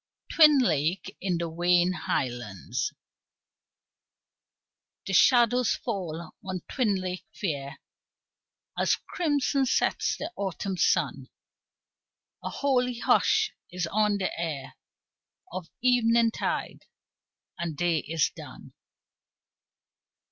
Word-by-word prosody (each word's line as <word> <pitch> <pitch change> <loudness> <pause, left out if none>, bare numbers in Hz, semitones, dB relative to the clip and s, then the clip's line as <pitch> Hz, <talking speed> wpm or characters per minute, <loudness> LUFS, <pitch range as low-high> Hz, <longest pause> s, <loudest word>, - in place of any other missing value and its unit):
Twin 305 -3 +7
Lake 170 - 0
In 180 -3 0
the 170 0 -2
Wayne 175 +2 +2
Highlands 120 - -3 2.1
The 195 - -3
shadows 245 +3 +4
fall 170 -8 -5
on 185 -2 -4
Twin 225 -7 +1
Lake 185 0 -4
fair 140 -7 -3 1.0
As - - +2
crimson 285 -5 0
sets - - +1
the 325 - -5
Autumn 195 0 -3
sun; - - +1 1.1
A - - -3
holy 250 -3 0
hush 435 - +2 0.2
is 180 -1 -2
on 210 -1 +2
the 190 -2 -2
air 145 -5 -4 0.8
Of 180 -3 -6
eventide 235 -2 +1 0.7
and 165 -3 -3
day 175 -2 +1
is 160 +1 0
done. - - -11
185 Hz, 95 wpm, -27 LUFS, 165-245 Hz, 2.1 s, Twin